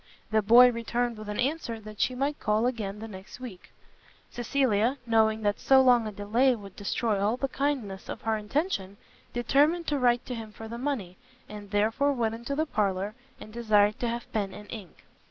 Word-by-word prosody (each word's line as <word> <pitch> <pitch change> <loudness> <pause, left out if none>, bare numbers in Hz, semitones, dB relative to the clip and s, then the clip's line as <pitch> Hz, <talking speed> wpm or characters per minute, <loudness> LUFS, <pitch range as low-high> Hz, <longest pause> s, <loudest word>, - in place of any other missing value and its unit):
The 220 0 +3
boy 240 +4 +7
returned 235 0 -2
with 215 -1 -8
an 210 - -4
answer 255 -4 -1
that 215 -1 -8
she 255 - +1
might 280 +3 -1
call 215 +2 +1
again 215 -5 -2
the 220 +1 -7
next 195 +2 -11
week. 230 -8 -10 0.6
Cecilia, 240 0 +1
knowing 220 -1 +2
that 205 0 +1
so 265 -1 +5
long 245 -3 +5
a - - -4
delay 225 +6 +2
would 200 -4 -11
destroy 205 0 -1
all 215 +4 +1
the 275 - -1
kindness 260 -9 -3
of - - -6
her 225 -1 +1
intention, 210 - -2 0.3
determined 290 +8 +2
to 290 -2 0
write 245 -1 +2
to 250 - -5
him 225 -2 -7
for 225 - -9
the 235 +1 -6
money, 235 -10 -3 0.3
and 210 -1 -9
therefore 220 +8 +2
went 230 -4 0
into 235 +5 -4
the 310 +2 +1
parlour, 200 -5 -1 0.3
and 215 - -11
desired 215 -3 +3
to 240 - -1
have 235 0 -5
pen 200 -3 -2
and 210 0 -11
ink. 205 -7 -10
225 Hz, 195 wpm, -28 LUFS, 210-250 Hz, 0.6 s, boy